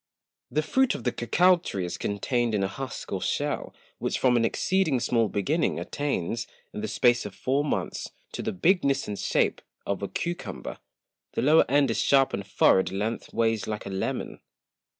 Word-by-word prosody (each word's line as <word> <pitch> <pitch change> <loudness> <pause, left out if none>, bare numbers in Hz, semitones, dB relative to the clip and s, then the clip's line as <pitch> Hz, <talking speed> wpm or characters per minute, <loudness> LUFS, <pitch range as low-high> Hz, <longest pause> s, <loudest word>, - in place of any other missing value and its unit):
The 155 - 0
Fruit 265 +11 +2
of - - -7
the 125 - +1
Cocao 180 +11 +4
Tree 95 - -4
is 85 - -5
contained 115 +3 0
in 100 - +1
a - - +1
Husk 130 +6 -6
or - - -2
Shell, - - -1 0.3
which - - -1
from 125 -2 +3
an 120 - +3
exceeding 160 +3 +1
small 115 -2 +1
Beginning, 145 - 0
attains, 115 -5 -2 0.3
in 105 - -5
the 110 - -2
space 120 0 +3
of 105 -2 -8
four 135 +3 0
Months, 150 - -2 0.2
to - - -4
the - - -2
Bigness 140 - +2
and 100 -1 -4
Shape - - +1 0.2
of 100 0 -2
a 100 - -2
Cucumber; 175 - -5 0.5
the - - -1
lower 155 +4 +5
End 140 -2 +3
is 115 - -1
sharp 135 -1 +4
and 100 - -2
furrow'd 95 0 +4
length 105 +4 -3
ways 115 -2 0
like 105 -1 -4
a 100 - -5
Melon[c]. 95 0 -3
120 Hz, 185 wpm, -27 LUFS, 105-145 Hz, 0.5 s, lower